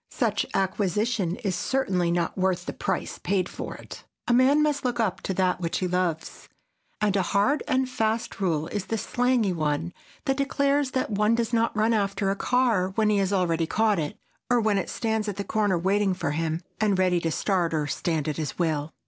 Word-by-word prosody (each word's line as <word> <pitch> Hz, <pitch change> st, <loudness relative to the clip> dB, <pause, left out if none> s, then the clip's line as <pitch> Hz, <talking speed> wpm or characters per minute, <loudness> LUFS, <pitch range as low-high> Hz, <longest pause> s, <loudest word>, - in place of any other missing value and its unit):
Such 220 Hz, -4 st, 0 dB
acquisition 195 Hz, 0 st, 0 dB
is 195 Hz, -3 st, 0 dB
certainly 190 Hz, -10 st, 0 dB
not 170 Hz, -1 st, 0 dB
worth 185 Hz, -1 st, 0 dB
the -, -, -4 dB
price -, -, -3 dB
paid 185 Hz, -1 st, 0 dB
for -, -, -6 dB
it. -, -, -11 dB, 0.2 s
A 240 Hz, -, +3 dB
man 270 Hz, +5 st, +5 dB
must 295 Hz, -2 st, 0 dB
look 245 Hz, -2 st, -1 dB
up 195 Hz, -5 st, 0 dB
to 190 Hz, -, -2 dB
that 185 Hz, -1 st, +1 dB
which 165 Hz, -1 st, -1 dB
he 185 Hz, -, -1 dB
loves. 180 Hz, -3 st, -2 dB, 0.5 s
And 210 Hz, -2 st, +1 dB
a 195 Hz, -, +3 dB
hard 205 Hz, -, +1 dB
and 260 Hz, -2 st, +1 dB
fast 225 Hz, -4 st, -1 dB
rule 160 Hz, -5 st, +1 dB
is 205 Hz, -3 st, -3 dB
the 225 Hz, -, -1 dB
slangy 245 Hz, -3 st, +1 dB
one 155 Hz, +1 st, -1 dB, 0.3 s
that 270 Hz, -2 st, +1 dB
declares 280 Hz, 0 st, +1 dB
that 255 Hz, -, -1 dB
one 210 Hz, +2 st, +2 dB
does 235 Hz, 0 st, -1 dB
not 230 Hz, -1 st, +1 dB
run 220 Hz, +2 st, +3 dB
after 200 Hz, -2 st, 0 dB
a -, -, -1 dB
car 230 Hz, -5 st, +2 dB
when 215 Hz, -1 st, +3 dB
he 210 Hz, -, +2 dB
has 195 Hz, 0 st, 0 dB
already 170 Hz, -4 st, +1 dB
caught 215 Hz, +2 st, +2 dB
it, 150 Hz, -2 st, -3 dB, 0.3 s
or 245 Hz, -1 st, +4 dB
when 215 Hz, -3 st, +2 dB
it -, -, -4 dB
stands 220 Hz, -1 st, -1 dB
at 200 Hz, -, -4 dB
the 200 Hz, -, -3 dB
corner 205 Hz, -3 st, +1 dB
waiting 195 Hz, +2 st, +1 dB
for 145 Hz, -, -2 dB
him, 160 Hz, +2 st, -1 dB, 0.2 s
and 210 Hz, -3 st, +2 dB
ready 185 Hz, -1 st, +3 dB
to 165 Hz, -, -1 dB
start 175 Hz, 0 st, 0 dB
or 155 Hz, -2 st, 0 dB
stand 160 Hz, 0 st, -1 dB
at 150 Hz, -, -2 dB
his 155 Hz, -3 st, -4 dB
will. 155 Hz, -3 st, -1 dB
200 Hz, 210 wpm, -26 LUFS, 175-225 Hz, 0.5 s, man